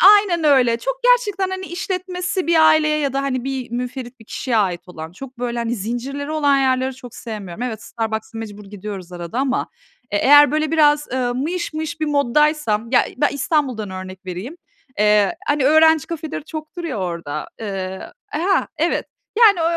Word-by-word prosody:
aynen 370 -6 +1
öyle, 255 -6 +4
çok - - -2
gerçekten, 415 -7 +3
hani, 375 0 -4
işletmesi 365 +1 -3
bir 340 - +3
aileye 305 -1 +4
ya 280 -3 -1
da, 275 - 0
hani, 255 -3 -2
bir 265 -3 -4
münferit 245 +1 -5
bir 225 - -15
kişiye 240 +1 -1
ait 185 -5 +1
olan, 160 -2 -8
çok 255 +5 -11
böyle, 240 -1 -2
hani, 235 +1 -1
zincirleri 250 +7 -4
olan 285 -3 +3
yerleri 260 -1 +1
çok 245 -2 -11
sevmiyorum. 210 -4 -7
Evet, 220 -4 -4
Starbucks'a 220 0 -4
mecbur 210 -2 -7
gidiyoruz 195 -2 -8
arada 175 +6 -5
ama, 270 -1 0 0.4
eee, 205 - +1
eğer 290 0 +8
böyle 310 0 0
biraz 295 -2 +4 0.3
mıyış 320 +5 -2
mıyış 315 +1 -4
bir 310 - +2
mod'daysam, 285 -5 +2
ya, 250 - +5
ben 290 +1 +3
İstanbul'dan 270 - 0
örnek 185 0 -8
vereyim, 190 - -6 0.4
eee, 210 - +4
hani, 290 -2 +2
öğrenci 315 0 +5
kafeleri 315 -3 -5
çoktur 315 +2 -7
ya 300 -9 -3
orada, 170 -5 -4
ııı, 190 -3 -5
ha, 360 +5 +1
evet. 335 +3 0 0.3
Yani, 430 -6 +7
ö - - +1
265 Hz, 170 wpm, -20 LUFS, 220-310 Hz, 0.4 s, eğer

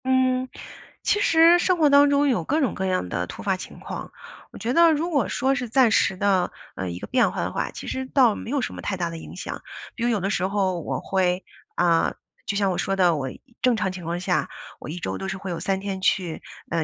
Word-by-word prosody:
嗯， 260 0 +2 0.5
其 415 - +2
实 335 -2 +6
生 365 0 +2
活 310 -3 +4
当 285 0 +6
中 285 0 +3
有 235 -11 +1
各 300 - 0
种 265 -9 +1
各 190 - -3
样 185 - 0
的 90 0 -2
突 - - -8
发 195 -2 +1
情 185 - -10
况。 - - -7 0.4
我 - - -11
觉 240 +2 -2
得 335 +2 +6
如 320 +3 0
果 280 -5 +1
说 270 +1 +1
是 250 -3 -3
暂 250 -1 +4
时 195 -3 +2
的， 190 -2 +2 0.2
呃， 95 -1 -3
一 85 - -5
个 - - -6
变 255 0 +2
化 - - -3
的 - - -2
话， - - -2
其 - - -8
实 260 0 -3
倒 255 -5 +4
没 225 - -7
有 280 +1 0
什 - - -3
么 - - -7
太 190 - -3
大 170 -2 -1
的 165 - -7
影 - - -10
响。 - - -6 0.3
比 235 - -4
如 240 - +2
有 225 -3 +1
的 195 +1 -1
时 185 -3 0
候 190 -3 0
我 - - -3
会， 185 -1 0 0.3
啊， 170 -2 +2 0.3
就 200 - -1
像 200 -2 +2
我 180 - -2
说 195 +2 0
的， 180 -3 +4
我 135 -3 -3 0.3
正 250 -2 +3
常 195 -3 0
情 185 -1 -8
况 170 +2 -3
下， 180 0 0 0.3
我 - - -8
1 160 - -5
周 175 - -3
都 195 - -4
是 190 +1 -3
会 190 -1 -6
有 170 - -3
3 195 -1 -1
天 195 -1 -4
去， 180 -3 0 0.3
呃， 165 -1 +1
195 Hz, 265 characters per minute, -24 LUFS, 180-260 Hz, 0.5 s, 实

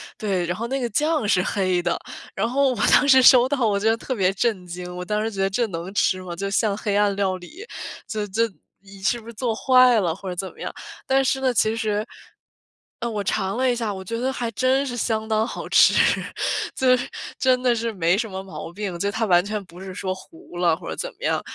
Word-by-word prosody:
对， 190 -5 -1
然 175 - -2
后 230 +5 -4
那 270 +2 -2
个 245 - -1
酱 300 -1 +1
是 180 - +3
黑 185 -2 0
的， 175 - 0 0.4
然 205 +4 0
后 275 +3 +2
我 255 - -1 0.2
当 290 - +5
时 265 -1 +8
收 250 0 +7
到， 265 -6 +1
我 200 -1 +1
觉 220 +2 +2
得 225 - +2
特 255 - -4
别 190 -4 +2
震 205 -3 -1
惊， 180 +1 -7
我 180 - -5
当 210 +3 -1
时 225 - -2
觉 195 - -4
得 195 - +2
这 235 +5 0
能 175 0 -6
吃 185 -1 +2
吗？ 175 -2 -6
就 195 +3 -3
像 210 -1 +1
黑 205 -2 -2
暗 205 -1 +2
料 195 -2 0
理， 310 - -11 0.4
这 210 -1 -3
这 225 +4 +1 0.3
你 195 0 -14
是 235 +5 +1
不 225 - -16
是 235 - -8
做 230 0 -2
坏 255 -1 +5
了 170 -4 0
或 190 0 -7
者 180 - -4
怎 190 +1 -4
么 - - -21
样？ - - -4 0.4
但 270 0 +3
是 265 0 +1
呢， 260 - +2
其 220 -1 +2
实 215 -1 -1 0.9
嗯， 235 -1 -3
我 205 - -2
尝 190 +2 -1
了 260 0 +2
一 - - 0
下， 225 -3 -2
我 190 -1 -7
觉 230 +5 -4
得 260 +2 0
还 240 -2 -3
真 260 +4 +1
是 245 - -4
相 220 -2 -1
当 220 +1 +1
好 - - -6
吃。 - - +6 0.8
就 255 -1 +4
是 - - -5 0.3
真 255 -1 +2
的 245 -2 +3
是 230 0 -2
没 175 -1 +2
什 225 +1 -2
么 190 0 -5
毛 190 -3 -8
病， 195 -3 -4
就 200 - 0
它 225 +2 -1
完 175 -3 +4
全 210 +1 -3
不 175 0 -14
是 190 -1 -7
说 185 0 -3
糊 325 - -15
了 175 -2 +3
或 - - -9
者 - - -4
怎 - - -3
么 - - -12
样， - - +1
210 Hz, 270 characters per minute, -23 LUFS, 190-245 Hz, 0.9 s, 时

